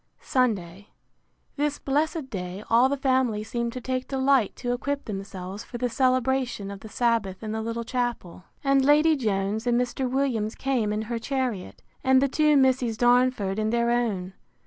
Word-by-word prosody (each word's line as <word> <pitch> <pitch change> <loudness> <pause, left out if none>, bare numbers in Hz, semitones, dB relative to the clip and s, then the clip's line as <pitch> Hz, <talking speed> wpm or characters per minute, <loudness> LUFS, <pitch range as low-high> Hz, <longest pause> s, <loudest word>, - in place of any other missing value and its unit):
Sunday. 205 -7 -1 0.7
This 290 0 0
blessed 295 0 -1
day 185 0 -5
all 240 +3 +5
the 280 - -1
family 260 -6 +1
seemed 235 +1 -3
to 255 - -6
take 255 +1 -3
delight 265 -4 +2
to 245 0 -2
equip 280 +3 -3
themselves 195 -1 -6
for 240 - -8
the 245 +1 -1
celebration 255 -4 0
of 200 - -8
the 220 - -11
Sabbath 225 -4 0
in 215 - -4
the 220 0 -2
little 230 +1 -3
chapel; 230 -8 -3 0.2
and 275 -1 +3
Lady 300 +3 +5
Jones 215 -2 -1
and 240 0 +3
Mr. 250 +1 -1
Williams 245 -5 0
came 250 -6 0
in 210 +1 -1
her 230 +1 -3
chariot, 250 -6 -3 0.2
and 265 0 +5
the 275 - +3
two 300 +2 +3
Misses 255 -4 +2
Darnford 240 -5 +2
in 215 0 0
their 235 +1 +1
own. 205 -7 -1
240 Hz, 170 wpm, -26 LUFS, 215-265 Hz, 0.7 s, all